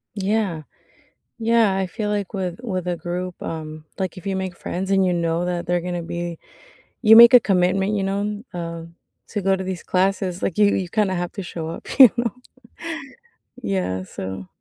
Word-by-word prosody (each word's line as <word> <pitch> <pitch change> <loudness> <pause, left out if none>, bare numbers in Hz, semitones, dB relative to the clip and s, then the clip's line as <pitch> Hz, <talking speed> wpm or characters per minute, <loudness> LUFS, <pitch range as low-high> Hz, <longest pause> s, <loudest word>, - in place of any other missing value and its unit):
Yeah. 200 -5 -1 0.8
Yeah. 225 -3 +3
I 190 -1 0
feel 210 +4 -4
like 205 -2 -2
with 185 -2 -3
with 185 -6 -3
a 175 - -1
group, 175 +2 -5
um, 155 -1 -6
like, 185 -3 -3
if 185 - -11
you 195 -1 -1
make 185 -2 -4
friends 190 +2 -4
and 195 -1 +4
you 180 - +2
know 170 0 0
that 175 -1 -2
they're 175 0 +1
gonna 175 0 -4
be 170 0 -5 0.6
you 220 -1 +8
make 235 +2 +10
a 250 - +11
commitment, 190 0 +1
you 200 - 0
know, 205 +2 -2
uh, 170 -1 -5 0.5
to 205 - -3
go 195 0 +2
to 190 - -4
these 185 -2 -5
classes. 185 -1 0
Like, 170 - -2
you 210 -1 +6
you 185 -2 -2
kinda 205 -2 +1
have 175 0 -3
to 200 - -5
show 165 -2 -6
up, 165 - -8
you 255 - +11
know? 235 -3 0 1.3
Yeah, 185 - -2
so. 95 0 -7
185 Hz, 190 wpm, -22 LUFS, 175-200 Hz, 1.3 s, a